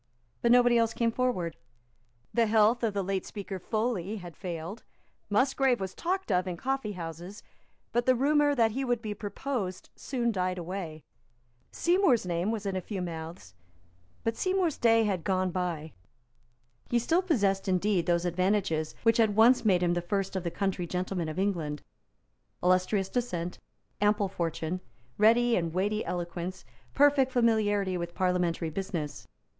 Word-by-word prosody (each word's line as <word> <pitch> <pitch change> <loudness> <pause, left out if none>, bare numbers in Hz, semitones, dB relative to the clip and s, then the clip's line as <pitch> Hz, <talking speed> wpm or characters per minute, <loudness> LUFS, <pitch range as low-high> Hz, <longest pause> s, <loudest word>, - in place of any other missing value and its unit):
But 235 - +3
nobody 245 -1 +6
else 230 -1 +1
came 230 -1 +1
forward. 225 -10 -1 0.8
The 230 -1 +3
health 220 +2 +4
of 220 -4 0
the 200 - 0
late 190 0 -1
Speaker 195 -2 -6
Foley 215 -1 -2
had 175 -6 -9
failed. 175 +4 -6 0.5
Musgrave 260 +3 +2
was 190 -1 -4
talked 370 - -2
of 180 0 +2
in 175 -2 -3
coffeehouses; 195 - -4 0.5
but 240 +1 0
the 255 - +5
rumour 290 +2 +3
that 225 -3 +3
he 265 +5 -2
would 245 -2 -1
be 210 -1 -3
proposed 205 -2 -4
soon 240 -3 -1
died 185 -2 -1
away. 170 -3 -5 0.7
Seymour's 345 - +3
name 175 +2 -1
was 220 -2 -3
in 195 -1 -1
a 185 - -1
few 195 +2 -5
mouths; 165 - -6 0.7
but 225 0 0
Seymour's 370 -2 0
day 225 -1 +5
had 190 -6 -1
gone 185 -2 0
by. 170 -4 -3 1.0
He 240 - +2
still 325 +10 +2
possessed, 205 - +1
indeed, 185 -1 +1
those 170 0 +2
advantages 175 -3 0
which 230 -1 +4
had 220 -3 +3
once 235 +4 +6
made 185 -5 +3
him 175 0 +2
the 175 - 0
first 195 +2 -2
of 190 - -2
the 170 - -1
country 190 -1 -2
gentlemen 180 -1 -2
of 155 - -6
England, 170 -7 -1 0.8
illustrious 185 +2 +2
descent, 180 -9 -3 0.4
ample 205 -1 +2
fortune, 170 0 -3 0.4
ready 235 +2 +5
and 170 -2 -1
weighty 205 +3 0
eloquence, 175 +1 -4 0.3
perfect 280 -2 +4
familiarity 205 -6 +2
with 170 0 -5
parliamentary 180 -3 0
business. 165 -4 -4
195 Hz, 155 wpm, -29 LUFS, 180-230 Hz, 1.0 s, nobody